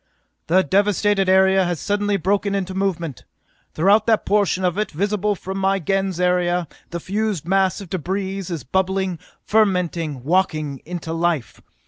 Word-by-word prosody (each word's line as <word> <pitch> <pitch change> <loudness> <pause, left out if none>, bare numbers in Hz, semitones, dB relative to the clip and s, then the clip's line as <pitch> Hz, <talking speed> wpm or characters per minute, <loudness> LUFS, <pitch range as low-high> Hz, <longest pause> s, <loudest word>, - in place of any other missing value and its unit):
"The 185 +3 +4
devasted 200 0 +2
area 190 0 +5
has 175 -3 -2
suddenly 205 0 0
broken 200 +2 0
into 190 -1 -2
movement! 170 - -2 0.5
Throughout 200 +7 +4
that 225 -2 +2
portion 200 -2 +1
of 180 -1 +1
it 215 - -1
visible 205 +4 -1
from 190 +1 -5
my 195 0 +2
Gens 195 0 -1
area, 180 -1 +1 0.2
the 170 - -4
fused 200 -3 -2
mass 190 0 +2
of 190 - -10
debris 190 +2 -2
is 170 -7 -5
bubbling, 190 +3 -1 0.3
fermenting, 175 - +1
walking 155 -4 0
into 165 -1 -5
life! 165 -6 -1
190 Hz, 145 wpm, -21 LUFS, 175-195 Hz, 0.5 s, area